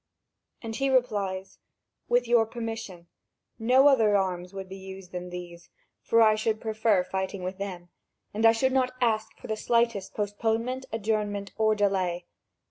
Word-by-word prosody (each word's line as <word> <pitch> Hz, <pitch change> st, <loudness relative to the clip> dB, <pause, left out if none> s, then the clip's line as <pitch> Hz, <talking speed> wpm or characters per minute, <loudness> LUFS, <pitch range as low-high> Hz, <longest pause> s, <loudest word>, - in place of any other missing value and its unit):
And 225 Hz, -1 st, -5 dB
he 275 Hz, 0 st, +1 dB
replies: 205 Hz, -7 st, 0 dB, 0.5 s
"With 245 Hz, 0 st, +2 dB
your 235 Hz, -2 st, +4 dB
permission, 225 Hz, -7 st, -6 dB, 0.5 s
no 255 Hz, +5 st, +5 dB
other 220 Hz, -7 st, +5 dB
arms 180 Hz, -2 st, -2 dB
would 195 Hz, -1 st, -7 dB
be 190 Hz, -, -8 dB
used 190 Hz, -1 st, -10 dB
than 180 Hz, 0 st, -6 dB
these, 175 Hz, -1 st, -9 dB, 0.3 s
for 230 Hz, 0 st, +4 dB
I 215 Hz, -1 st, +6 dB
should 215 Hz, 0 st, -1 dB
prefer 220 Hz, -3 st, +1 dB
to -, -, -20 dB
fight 190 Hz, 0 st, -2 dB
with 185 Hz, +1 st, -5 dB
them, 180 Hz, -3 st, -6 dB, 0.4 s
and 215 Hz, +2 st, -2 dB
I 225 Hz, -, +8 dB
should 260 Hz, +3 st, +1 dB
not 255 Hz, -1 st, +1 dB
ask 220 Hz, -3 st, 0 dB
for -, -, -13 dB
the 220 Hz, -, -2 dB
slightest 230 Hz, -3 st, 0 dB
postponement, 225 Hz, +5 st, -1 dB
adjournment 210 Hz, -2 st, -2 dB
or 215 Hz, -1 st, +2 dB
delay. 185 Hz, -4 st, 0 dB
215 Hz, 160 wpm, -27 LUFS, 190-230 Hz, 0.5 s, I